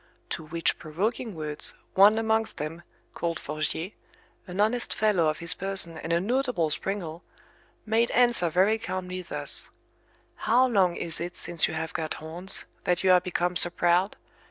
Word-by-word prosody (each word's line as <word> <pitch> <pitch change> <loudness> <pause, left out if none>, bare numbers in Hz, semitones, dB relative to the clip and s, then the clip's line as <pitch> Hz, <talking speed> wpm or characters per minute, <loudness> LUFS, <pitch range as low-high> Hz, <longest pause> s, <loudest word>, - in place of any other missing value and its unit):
To - - -3
which 165 +1 -1
provoking 205 +7 -3
words, 150 -2 0 0.2
one 205 +3 +6
amongst 220 0 0
them, 155 +3 -5 0.3
called 170 -1 -2
Forgier, 155 +4 -3 0.6
an 180 +2 -6
honest 225 +4 +1
fellow 205 -7 +2
of 155 0 0
his 170 -1 +1
person 190 -4 +1
and 165 - -5
a 170 - +3
notable 235 - 0
springal, 170 -1 -3 0.6
made 225 +2 +2
answer 240 -8 +4
very 195 +7 +3
calmly 185 -4 -4
thus: 180 - -2 0.7
How 245 +4 +3
long 190 -7 +2
is 165 -1 -4
it 175 +1 -5
since 170 -2 +1
you 160 - -5
have 160 0 -4
got 155 -1 -2
horns, 170 +4 -3 0.2
that 180 -1 0
you 190 - +5
are 180 -1 +6
become 180 0 -1
so 175 - +5
proud? 175 +3 +1
180 Hz, 160 wpm, -27 LUFS, 165-210 Hz, 0.7 s, one